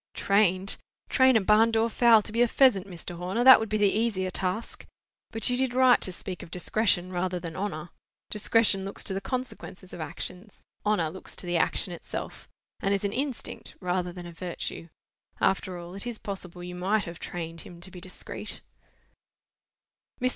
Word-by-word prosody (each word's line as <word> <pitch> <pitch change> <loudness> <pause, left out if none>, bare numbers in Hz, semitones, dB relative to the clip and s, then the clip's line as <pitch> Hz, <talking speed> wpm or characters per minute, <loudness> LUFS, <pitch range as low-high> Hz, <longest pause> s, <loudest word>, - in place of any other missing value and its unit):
"Trained! 195 -1 +2 0.3
Train 260 -2 +5
a - - +2
barn 215 +3 +5
door 225 0 +2
fowl 230 -1 +5
to 215 - -7
be 230 +2 +1
a 240 - +6
pheasant, 230 -7 +4
Mr. 175 -1 -8
Horner! 185 +7 -1
That 260 0 +10
would 220 -1 -3
be 215 - +1
the 205 -2 +4
easier 205 -4 0
task. 190 +5 -3 0.4
But 225 -1 0
you 250 - +2
did 255 -1 0
right 255 -1 +6
to 185 - +2
speak 180 0 -6
of - - -10
discretion 185 0 +1
rather 180 0 -1
than 165 -2 -7
honour. 180 -4 -4 0.4
Discretion 210 -2 +3
looks 195 +1 -3
to 195 - +2
the 195 - -2
consequences 250 -7 -5
of - - -6
actions—honour 185 0 -4
looks 190 - -5
to - - -2
the 175 -1 0
action 175 +2 0
itself, 170 - -7 0.3
and 195 +1 +1
is 200 - -2
an 200 - -1
instinct 270 -2 -4
rather 180 -1 -1
than 175 0 -9
a 175 - -8
virtue. 170 -1 -5 0.5
After 190 -1 +1
all, 175 +1 -9
it 200 +5 -5
is 240 -2 -3
possible 185 -5 -7
you 180 0 -6
might 195 +4 +1
have 170 0 -8
trained 165 -1 -6
him 175 - -11
to 180 +2 -8
be 180 - -10
discreet." 185 0 -5 1.6
Mr. 255 - +2
195 Hz, 185 wpm, -27 LUFS, 180-225 Hz, 1.6 s, That